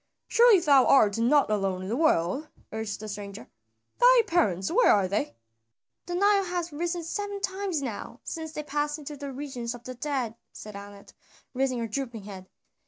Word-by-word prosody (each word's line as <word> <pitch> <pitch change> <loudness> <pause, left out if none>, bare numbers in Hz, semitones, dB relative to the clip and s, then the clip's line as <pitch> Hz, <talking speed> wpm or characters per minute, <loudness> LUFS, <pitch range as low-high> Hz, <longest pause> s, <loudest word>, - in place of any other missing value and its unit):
"Surely 465 -4 +6
thou 285 -5 +5
art 215 -6 +5
not 255 +1 +3
alone 195 -3 -1
in - - -6
the 220 - -1
world," 275 - +1 0.2
urged 220 -2 -4
the 215 - -7
stranger, 200 -8 -7 0.5
"thy - - +7
parents, 200 - +1
where 485 +7 +5
are 200 -3 +3
they?" 185 - -2 0.7
"The 350 - -3
Nile 400 +1 +3
hath 350 -3 -3
risen 340 +3 -2
seven 405 +4 -4
times 380 -5 -2
now 235 0 -6
since 320 -1 -5
they 300 - -5
passed 295 +1 -2
into 295 -1 -8
the 280 -1 -6
regions 255 -4 -5
of 240 - -13
the 255 - -7
dead," 255 -3 -2 0.2
said 210 -1 -10
Anat, 200 0 -11 0.4
raising 260 -1 0
her 230 -1 -2
drooping 230 -2 -4
head. 190 -2 -10
270 Hz, 175 wpm, -27 LUFS, 210-330 Hz, 0.7 s, thy